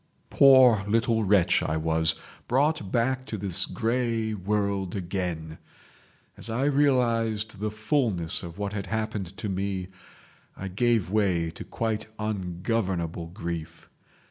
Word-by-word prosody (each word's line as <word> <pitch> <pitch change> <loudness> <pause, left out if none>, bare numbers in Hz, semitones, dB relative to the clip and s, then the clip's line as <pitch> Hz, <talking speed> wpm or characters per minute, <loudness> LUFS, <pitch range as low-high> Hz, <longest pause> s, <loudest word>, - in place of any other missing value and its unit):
"Poor 130 -6 +7
little 115 +1 +2
wretch 100 -3 +3
I 80 - -1
was—brought 95 - 0
back 130 +2 +1
to 110 - -4
this 95 -1 +2
grey 115 -1 -1
world 100 -1 -1
again! 90 -4 -4 0.8
As - - -6
I 115 +4 -1
realised 115 -7 +1
the 105 +1 -1
fulness 110 - 0
of 85 0 -9
what 100 0 -3
had 100 -2 -4
happened 105 -3 -3
to - - -4
me, 95 -1 -3 0.7
I 95 - -5
gave 110 -1 +1
way 90 -6 +1
to - - -8
quite 110 -2 -3
ungovernable 90 -4 -2
grief. 85 -3 -6
105 Hz, 120 wpm, -26 LUFS, 90-115 Hz, 0.8 s, Poor